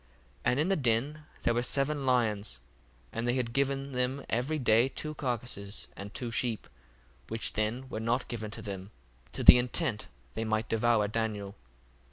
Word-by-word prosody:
1:32 - - -31 0.4
And 125 - +3
in 160 +5 +2
the 195 - +4
den 140 +3 0 0.2
there 120 - +3
were 120 - +1
seven 140 +2 0
lions, 110 - +1 0.5
and 115 +1 -2
they 120 - +2
had 120 -3 -1
given 140 0 0
them 130 +2 -1
every 130 +7 +1
day 120 -1 +4
two 155 +2 -4
carcases, 120 -7 -3
and 100 +1 -7
two 120 +3 -4
sheep: 115 -1 -1 0.6
which 115 0 -2
then 110 +5 -1
were 110 - -4
not 115 +3 0
given 110 -3 -4
to 105 - -6
them, 95 -1 -6 0.4
to - - -4
the 125 - +11
intent 120 -1 0 0.3
they 115 - -2
might 110 0 0
devour 115 -2 +3
Daniel. 105 -2 -2
120 Hz, 175 wpm, -30 LUFS, 110-130 Hz, 0.6 s, the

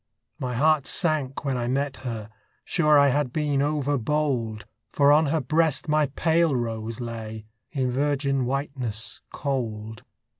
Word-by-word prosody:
My 125 -1 -3
heart 155 +2 +3
sank 150 -6 -1
when 135 -2 0
I 120 -1 -2
met 135 +2 -1
her: 115 -4 -6 0.3
sure 150 -4 +4
I 140 0 +6
had 140 -1 0
been 145 -2 0
overbold, 140 -6 0 0.2
For 140 +4 +4
on 155 +1 +5
her 155 +2 +1
breast 155 +2 +1
my 150 -1 +3
pale 160 +2 +2
rose 115 -1 -3
lay 110 -2 -6 0.3
In 130 -4 0
virgin 140 0 0
whiteness 130 -4 -3
cold. 110 -5 -3
135 Hz, 140 wpm, -25 LUFS, 120-150 Hz, 0.3 s, I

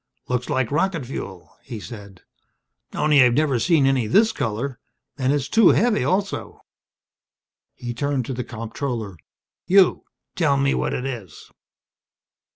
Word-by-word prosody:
"Looks 125 -1 -2
like 130 -2 0
rocket 165 -1 0
fuel," 95 -7 -8
he 120 -5 -8
said. 100 -4 -11 0.7
"Only 150 -2 +3
I've 125 -1 +4
never 145 -4 +2
seen 160 -1 +3
any 135 -4 +2
this 220 - +4
color. 120 - -3 0.4
And 130 -1 0
it's 145 -1 0
too 225 -4 +5
heavy, 225 -1 +2
also." 195 +2 -2 1.1
He 120 -1 -6
turned 140 0 -1
to 130 - -4
the 125 0 -3
comptroller. 115 -3 -5 0.5
"You 190 0 +4 0.3
tell 145 -5 +2
me 140 0 +2
what - - -1
it 125 - -4
is." 115 - -8
135 Hz, 140 wpm, -22 LUFS, 120-150 Hz, 1.1 s, too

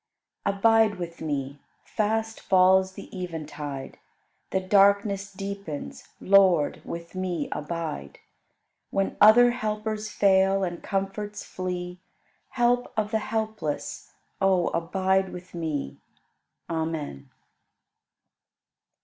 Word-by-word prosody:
30. 200 0 0
Abide 225 0 +4
with 170 -2 -7
me! 140 -2 -3 0.2
Fast 220 +1 -1
falls 190 0 +4
the - - -9
eventide, 150 -6 -6 0.5
The 190 - +1
darkness 200 +1 +3
deepens; 195 -6 -6
Lord, 190 -6 +4
with 170 0 -7
me 180 -5 -2
abide! 150 - -4 0.7
When 195 0 -1
other 240 +4 +8
helpers 215 -2 -3
fail 195 -1 +3
and 175 -2 -3
comforts 205 +1 -3
flee, 180 -1 -5 0.5
Help 245 -1 +1
of 210 -1 0
the 220 - +2
helpless, 215 -8 -3 0.3
O 190 -3 +3
abide 190 +2 +1
with 180 0 -10
me! 155 - -3 0.7
Amen. 160 - -4
190 Hz, 100 wpm, -26 LUFS, 170-210 Hz, 0.7 s, other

